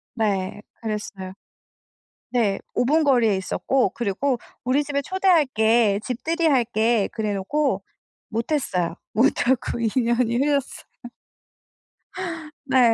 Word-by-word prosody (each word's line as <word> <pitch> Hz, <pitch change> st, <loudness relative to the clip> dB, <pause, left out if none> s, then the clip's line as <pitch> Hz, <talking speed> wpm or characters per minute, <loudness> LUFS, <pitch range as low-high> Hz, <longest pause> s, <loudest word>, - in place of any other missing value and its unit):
네. 205 Hz, -3 st, -1 dB, 0.2 s
그랬어요. 205 Hz, -4 st, -5 dB, 1.0 s
네. 220 Hz, -6 st, +1 dB, 0.2 s
5 245 Hz, -, +2 dB
분 310 Hz, +4 st, +3 dB
거리에 240 Hz, -7 st, +4 dB
있었고 245 Hz, +4 st, 0 dB
그리고 240 Hz, +4 st, -1 dB, 0.3 s
"우리 265 Hz, +4 st, +2 dB
집에 280 Hz, 0 st, -1 dB
초대할게. 245 Hz, -, +3 dB
집들이 325 Hz, +7 st, -1 dB
할게." 235 Hz, -5 st, +2 dB
그래 215 Hz, -2 st, -2 dB
놓고 280 Hz, +10 st, 0 dB, 0.5 s
못했어요. 225 Hz, -, -1 dB, 0.2 s
못 230 Hz, +4 st, +4 dB, 0.2 s
하고 255 Hz, -2 st, +1 dB
2 230 Hz, -, +1 dB
년이 235 Hz, 0 st, +1 dB
흘렀어요. 280 Hz, 0 st, 0 dB, 1.8 s
네. 255 Hz, -4 st, +4 dB
235 Hz, 220 characters per minute, -23 LUFS, 215-275 Hz, 1.8 s, 거리에